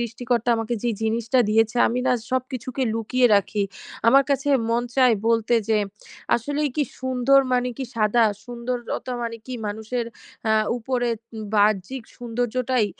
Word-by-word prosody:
সৃষ্টিকর্তা 240 -1 0
আমাকে 225 +1 -2
যেই 235 -2 0
জিনিসটা 230 +3 +1
দিয়েছে 225 +2 +2
আমি 245 +2 -1
না 255 - +4 0.2
সবকিছুকে 255 0 -2
লুকিয়ে 245 +3 +2
রাখি। 200 +1 +1 0.4
আমার 275 +4 +7
কাছে 280 +1 0 0.2
মন 235 +1 +1
চায় 255 -4 +5
বলতে 230 0 +2 0.2
যে 220 - +4 0.6
আসলেই 290 +5 -1
কি 300 - +2 0.2
সুন্দর 260 +1 +3
মানে 250 0 +1
কি 265 - -3
সাদা? 225 +1 +3 0.2
সুন্দরতা 245 +1 -4
মানে 230 0 -3
কি 255 - -6
মানুষের 220 +3 -3 0.4
আ - - +4 0.3
উপরে 245 0 -1 0.5
বাহ্যিক 210 +4 +2
সৌন্দর্যটাই? 245 0 0
240 Hz, 140 wpm, -23 LUFS, 225-255 Hz, 0.6 s, আমার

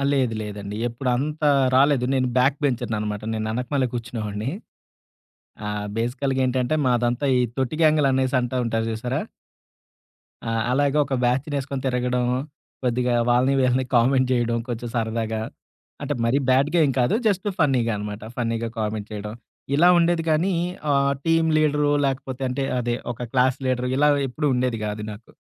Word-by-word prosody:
ఆహ్, 140 - +1
లేదు 130 -5 +1
లేదండి. 105 0 -6
ఎప్పుడంత 135 +5 -2 0.3
రాలేదు. 135 -1 +4
నేను 130 -1 +1
బ్యాక్‌బెంచర్ననమాట. 120 -6 0
నేను 110 0 -2
ఎనకమాలే 130 +2 -1
కూర్చునేవాడిని. 110 -1 -4 1.2
ఆహ్, 105 0 -3
బేసికల్‌గా 130 +3 -1
ఏంటంటే 130 +3 0
మాదంతా 120 +3 +1
ఈ - - +3 0.2
తొట్టి‌గ్యాంగులనేసి 135 -2 +2
అంటా 125 +1 -2
ఉంటారు 115 0 -1
చూసారా? 120 +3 -2 1.3
ఆ! - - -1 0.2
అలాగే 145 +2 +2
ఒక 135 -1 -3
బ్యాచ్‌నేసుకొని 135 +1 -1
తిరగడం, 125 -1 0 0.6
కొద్దిగా 125 0 +1 0.2
వాళ్ళని 130 +3 +3
వీళ్ళని 130 0 +2
కామెంట్ 130 +2 +3
జేయడం 120 -2 +1
కొంచెం 120 0 -4
సరదాగా. 110 -1 -1 0.6
అంటే 145 +1 -2
మరీ 125 +4 +2
బ్యాడ్‌గా 140 +6 +3
ఏం 135 - 0
కాదు, 125 +12 +2
జస్ట్ 200 0 +1
ఫన్నీగా 130 -7 +2
అనమాట. 105 0 -6
ఫన్నీగా 115 -1 -1
కామెంట్ 105 -1 -3
చేయడం. 105 +1 -5 0.4
ఇలా 170 +5 +5
ఉండేది 170 0 +2
గానీ, 175 +5 +2 0.4
ఆహ్, 140 0 +3
టీమ్ 165 0 +3
లీడరు 150 -1 +2
లేకపోతే 135 0 -4
అంటే 135 +2 -2
అదే 120 -1 -1 0.2
ఒక 120 +1 -7
క్లాస్‌ 130 0 +3
లీడరు 125 0 0
ఇలా 150 +1 +4 0.2
ఎప్పుడూ 150 +4 -1
ఉండేది 125 -2 0
గాదు 105 0 -4
నాకు. 110 +3 -13
125 Hz, 140 wpm, -23 LUFS, 115-140 Hz, 1.3 s, ఇలా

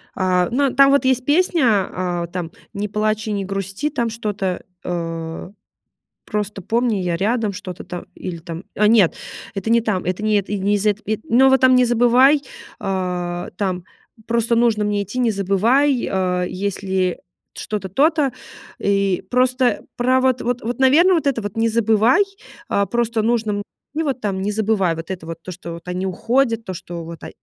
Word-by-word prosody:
А, 180 -1 +1
ну, 275 +1 +1
там 275 +1 +6
вот 280 -1 +3
есть 255 -1 +2
песня, 340 +1 +2 0.3
а, 175 -2 -2
там: 175 -2 -5 0.2
"Не 205 +1 -2
плачь 215 +1 -1
и - - -1
не 200 -2 -2
грусти". 195 +8 -3
Там 235 -5 -1
что-то, 205 -5 -3 0.2
э: 165 0 -4 0.7
"Просто 210 -1 -3
помни, 230 +2 0
я 175 -2 -1
рядом". 215 +1 0
Что-то 185 -3 -7
там 175 -1 -7
или 180 -2 -6
там, 170 +1 -7
а 210 0 +3
нет, 210 -6 +4 0.4
это 195 +3 -3
не 235 0 +4
там, 205 -5 -1
это 185 +4 -2
не 215 0 +2
это, 200 - -7
и 205 - -1
не 205 +2 +1
из 205 +1 -1
эт 205 0 +1
э, 215 0 0
но 265 +3 +6
вот 265 0 +4
там 255 0 +6
"Не 250 0 +5
забывай", 245 +5 +4 0.4
а, 180 -2 -3
"там 185 -3 -2 0.4
просто 235 0 +1
нужно 230 -3 +2
мне 205 -1 0
идти, 205 +6 -5
не 235 -3 +2
забывай", 230 +8 +2
а, 180 -1 0
"есть 200 +2 -4
ли 190 -2 0 0.4
что-то 200 -3 -4
то-то." 290 - +2 0.5
И 200 -2 +1
просто 250 0 +2 0.2
про 255 +2 +3
вот 260 -1 +2
вот 245 0 -1
вот, 240 +3 -3
наверно, 310 +8 +5
вот 310 -3 0
это 250 -5 +1
вот 205 0 -5
не 230 0 +2
забывай, 225 - +3 0.5
а, 200 - +2
просто 235 0 0
нужно 220 -3 0 0.3
и 320 - 0
вот 270 -5 -2
там 195 -2 -2
не 205 +2 -1
забывай 205 -5 +1
вот 165 +3 -7
это 180 -4 -6
вот 165 0 -5
то, 185 - -7
что 170 -1 -8
вот 170 +1 -11
они 180 +1 -2
уходят, 230 +4 0
то, 185 - -4
что 175 -1 -7
вот, 165 -1 -9
а - - -6
210 Hz, 190 wpm, -20 LUFS, 185-240 Hz, 0.7 s, там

